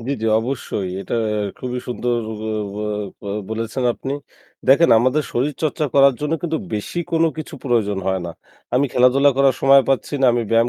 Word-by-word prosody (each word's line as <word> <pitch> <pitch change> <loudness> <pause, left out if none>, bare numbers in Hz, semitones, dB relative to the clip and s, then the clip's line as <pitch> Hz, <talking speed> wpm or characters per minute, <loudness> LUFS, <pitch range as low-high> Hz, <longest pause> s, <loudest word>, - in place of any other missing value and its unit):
জি, 120 +4 -5
জি, - - 0
অবশ্যই 115 -5 -3
এটা - - -4 0.4
খুবই 125 -1 -4
সুন্দর 120 0 -1 0.2
ব - - -7 0.3
ব - - -8 0.4
বো - - -11 0.2
বলেছেন 115 +3 -3
আপনি। 135 - -5 0.6
দেখেন 145 +5 +6
আমাদের 130 +6 +2
শরীরচর্চা 150 +4 -1
করার 140 -1 +6
জন্য 150 +1 -2
কিন্তু 160 -2 -1 0.2
বেশি 105 +11 -4
কোনো 165 0 +3
কিছু 155 +1 -7
প্রয়োজন 110 -6 +1
হয় 95 -1 0
না। - - -5 0.4
আমি 135 +3 +3
খেলাধুলা 130 +3 +4
করার 135 -1 +4
সময় 135 0 +6
পাচ্ছি 135 +2 0
না, 135 - +4
আমি 120 0 0
ব্যায়াম 115 +1 +3
130 Hz, 175 wpm, -20 LUFS, 115-140 Hz, 0.6 s, দেখেন